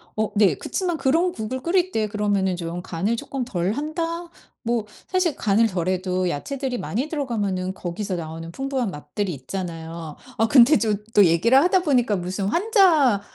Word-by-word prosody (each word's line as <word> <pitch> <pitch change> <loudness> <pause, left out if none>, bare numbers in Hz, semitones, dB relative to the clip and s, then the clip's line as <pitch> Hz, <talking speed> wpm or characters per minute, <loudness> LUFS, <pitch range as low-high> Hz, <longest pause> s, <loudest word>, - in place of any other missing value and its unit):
어 215 0 -1
네 200 -7 +4
그치만 350 - -2
그런 325 +7 +2
국을 245 0 -5
끓일 360 +4 +1
때 215 -7 0
그러면은 205 -3 0
좀 175 0 -5
간을 185 +6 -1
쪼끔 270 +2 -4
덜 185 -5 -1
한다? 330 +5 -3 0.3
뭐 235 -2 0 0.2
사실 370 -5 +1
간을 220 +2 +3
덜 180 -4 -3
해도 185 0 0
야채들이 255 - -3
많이 240 +5 -2
들어가면은 205 - -2
거기서 185 +2 -4
나오는 165 0 -6
풍부한 265 -1 -2
맛들이 170 +6 -4
있잖아요. 165 +1 -6 0.2
아 225 - +3
근데 260 +5 +7
좀 215 -3 0 0.2
또 205 - +7
얘기를 180 +10 +4
하다 365 +3 +3
보니까 250 - +2
무슨 185 +2 -3
환자 335 - +4
215 Hz, 340 characters per minute, -23 LUFS, 185-275 Hz, 0.3 s, 근데